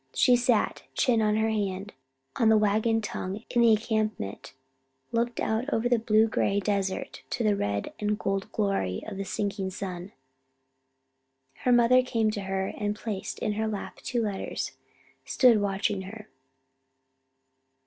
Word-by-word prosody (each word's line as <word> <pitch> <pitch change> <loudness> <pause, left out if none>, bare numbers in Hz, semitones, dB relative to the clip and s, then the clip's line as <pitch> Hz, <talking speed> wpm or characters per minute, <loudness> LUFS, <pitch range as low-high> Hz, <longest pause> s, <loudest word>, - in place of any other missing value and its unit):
She 250 - +5
sat, 240 -3 +1
chin 235 -3 +3
on 210 -1 +2
her 220 0 +1
hand, 200 -2 -2 0.4
on 225 -2 +4
a 220 - +6
wagon 215 +2 +2
tongue 205 0 -5
in 240 - +3
the 235 - +6
encampment, 215 - -1 0.6
looking 235 0 0
out 225 +6 -1
over 225 +2 +1
the 240 -1 +3
blue 220 0 +3
gray 200 -2 +1
desert 195 -2 -2
to 235 - -2
the 210 -2 +3
red 100 - -2
and 210 0 0
gold 195 -1 -2
glory 195 - -1
of 215 -3 -6
the 195 - -2
sinking 200 -1 -2
sun. 185 -1 -6 1.5
Her 250 - 0
mother 240 +1 +6
came 225 -3 0
to 210 -1 -4
her 190 0 -2
and 210 0 -1
placed 210 -3 -5
in 210 - -1
her 220 +1 -1
lap 210 -2 -5
the - - -16
two 240 -2 -1
letters, 205 -3 -3 0.5
stood 240 -5 +4
watching 200 0 0
her. 210 +3 -9
210 Hz, 155 wpm, -27 LUFS, 195-225 Hz, 1.5 s, a